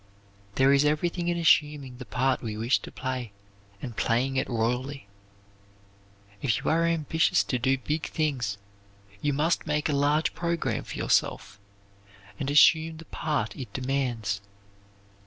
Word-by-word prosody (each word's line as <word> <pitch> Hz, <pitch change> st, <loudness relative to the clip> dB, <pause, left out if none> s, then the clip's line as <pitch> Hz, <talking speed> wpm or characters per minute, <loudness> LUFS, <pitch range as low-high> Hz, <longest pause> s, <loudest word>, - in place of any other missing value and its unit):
There 135 Hz, +1 st, +5 dB
is 140 Hz, +1 st, +4 dB
everything 170 Hz, +4 st, 0 dB
in 175 Hz, 0 st, 0 dB
assuming 150 Hz, -6 st, +2 dB
the 125 Hz, -, -8 dB
part 130 Hz, +1 st, 0 dB
we 110 Hz, -3 st, -5 dB
wish 115 Hz, +5 st, +2 dB
to -, -, -10 dB
play, 130 Hz, -5 st, -4 dB, 0.5 s
and 120 Hz, -4 st, -6 dB
playing 125 Hz, +5 st, +1 dB
it 130 Hz, -, 0 dB
royally. 125 Hz, +4 st, -2 dB, 1.4 s
If 115 Hz, -5 st, +1 dB
you -, -, -1 dB
are 165 Hz, +1 st, +3 dB
ambitious 160 Hz, -1 st, +2 dB
to 125 Hz, -, -2 dB
do 130 Hz, +3 st, +2 dB
big 150 Hz, +4 st, -3 dB
things, 130 Hz, -10 st, -1 dB, 0.6 s
you 145 Hz, -, +1 dB
must 155 Hz, +4 st, 0 dB
make 150 Hz, +1 st, 0 dB
a -, -, +1 dB
large 145 Hz, +3 st, +2 dB
program 170 Hz, -1 st, -2 dB
for -, -, -7 dB
yourself, 100 Hz, -, 0 dB, 0.8 s
and 140 Hz, -, -2 dB
assume 160 Hz, +2 st, +5 dB
the 165 Hz, -, -11 dB
part 145 Hz, -9 st, -2 dB
it 130 Hz, -, -7 dB
demands. 125 Hz, -6 st, -1 dB
140 Hz, 145 wpm, -27 LUFS, 125-155 Hz, 1.4 s, There